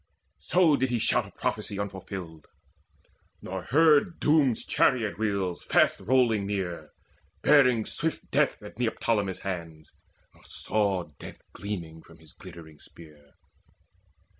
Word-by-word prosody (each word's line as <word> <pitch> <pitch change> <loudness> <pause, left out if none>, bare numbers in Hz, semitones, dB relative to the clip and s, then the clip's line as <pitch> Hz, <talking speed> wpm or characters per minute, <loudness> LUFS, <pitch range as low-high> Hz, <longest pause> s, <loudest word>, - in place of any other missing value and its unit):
So 165 -5 +3
did 130 0 0
he 120 - 0
shout - - +1
a - - -15
prophecy 100 - -2
unfulfilled, 95 -5 -7 0.9
Nor 95 -1 -6
heard 160 - +3
Doom's 145 -6 +2
chariot 115 -6 +1
wheels 100 -5 -1
fast - - +2
rolling 115 -5 +2
near 95 -4 -4 0.5
Bearing 125 -6 +4
swift 160 +1 -3
death 140 -6 +1
at 105 +2 -12
Neoptolemus' 105 -5 -1
hands, 85 -5 -6 0.4
Nor - - -23
saw 100 -4 -1 0.2
death - - -11
gleaming 85 -6 -6
from 80 +1 -18
his 80 -4 -15
glittering 80 -3 -13
spear. 75 -3 -16
100 Hz, 120 wpm, -27 LUFS, 85-125 Hz, 0.9 s, Bearing